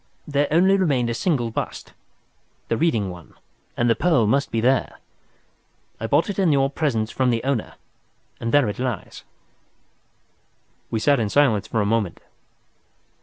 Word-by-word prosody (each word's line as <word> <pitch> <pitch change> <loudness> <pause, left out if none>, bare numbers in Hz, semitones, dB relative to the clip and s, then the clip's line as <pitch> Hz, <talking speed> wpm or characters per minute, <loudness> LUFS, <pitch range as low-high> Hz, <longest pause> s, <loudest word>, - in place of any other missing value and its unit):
There 145 -1 +1
only 185 +5 +4
remained 135 -10 +1
a - - -1
single 120 -3 -1
bust—the 115 - -8
Reading 110 - 0
one—and 90 +6 -7
the 115 - +5
pearl 140 -1 +2
must 140 +6 +1
be 115 - -1
there. 125 +3 +1 1.0
I 115 - -3
bought 145 +7 +2
it 205 -1 -4
in 185 -5 +3
your 135 -1 +2
presence 120 -8 -1
from 130 -1 +1
the 115 -2 0
owner—and 115 -2 -6
there 145 -4 +4
it 105 - -4
lies." 125 -7 -4 1.7
We 110 - -1
sat 140 +3 +3
in 110 -3 -1
silence 120 -6 +2
for 110 - -1
a - - 0
moment. 105 -4 -1
125 Hz, 145 wpm, -22 LUFS, 110-145 Hz, 1.7 s, the